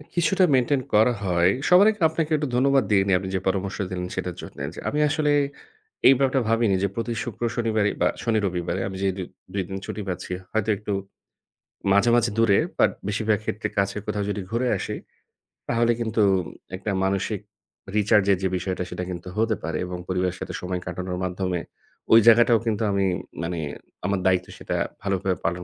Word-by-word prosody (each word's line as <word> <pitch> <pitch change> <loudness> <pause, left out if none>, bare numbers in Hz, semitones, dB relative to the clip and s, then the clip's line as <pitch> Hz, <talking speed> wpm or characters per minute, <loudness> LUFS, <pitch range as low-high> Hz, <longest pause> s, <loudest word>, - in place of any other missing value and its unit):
কিছুটা 180 +3 +3
মেইনটেইন 130 +2 +2
করা 110 +4 +5
হয়। 90 -1 +3 0.2
সবার 185 +4 +7
আগে 210 -3 -11
আপনাকে 160 0 -2
একটু 150 -1 -1
ধন্যবাদ 135 +1 +4
দিয়ে 100 -2 +5
নেই। 95 - +4
আপনি 95 0 -5
যে, - - +1
পরামর্শ 95 +1 -1
দিলেন 90 -1 -3
সেটার 90 -2 -3
জন্যে, - - -8
যে, - - -9
আমি 150 - -1
আসলে 150 -1 +1 0.8
এই 135 - +9
ব্যাপারটা 135 0 +2
ভাবিনি 115 -3 +3
যে, - - +3
প্রতি 115 +1 -2
শুক্র, 120 -3 -8
শনিবারে 110 -3 +1
বা - - +5 0.2
শনি, 115 -2 +2
রবিবারে 90 +1 -2
আমি 95 -1 -6
যেই 95 -1 +1
দু 95 - -3 0.3
দুই 100 -1 0
দিন 95 - -4
ছুটি 105 - -5
পাচ্ছি 90 0 -4 0.2
হয়তো 110 0 0
একটু 105 +1 -5 1.0
মাঝে, 100 +4 +4
মাঝে 120 -1 +2
দূরে 110 -4 +4 0.2
বাট - - +5 0.2
বেশিরভাগ 105 0 +1
ক্ষেত্রে 110 0 -2 0.4
কোথাও 105 -1 -1
যদি 100 0 -2
ঘুরে 120 +2 0
আসি, - - -4 0.7
তাহলে 120 0 +2
কিন্তু 110 -1 0 0.5
একটা 95 +3 -3
মানসিক 95 +2 0 0.6
রিচার্জ 105 -1 +4
এর 95 - +3
যে, - - +3
বিষয়টা 90 0 -3
সেটা 90 - -4
কিন্তু 90 0 -6
হতে 110 -1 +2
পারে 85 -2 -2
এবং 90 0 -5
পরিবারের 90 -1 -1
সাথে 95 -1 -5
সময় 90 0 -3
কাটানোর 90 +1 -4
মাধ্যমে 90 -1 -2 0.5
ঐ - - +8
জায়গাটাও 115 0 +7
কিন্তু 110 -1 0
আমি 100 -1 +1 0.4
মানে 85 0 -3 0.5
আমার 100 -1 +1
দায়িত্বে 90 -1 +2
সেটা - - -3 0.3
ভালোভাবে 95 -1 0
পালন 85 +1 -1
100 Hz, 180 wpm, -24 LUFS, 95-115 Hz, 1.0 s, এই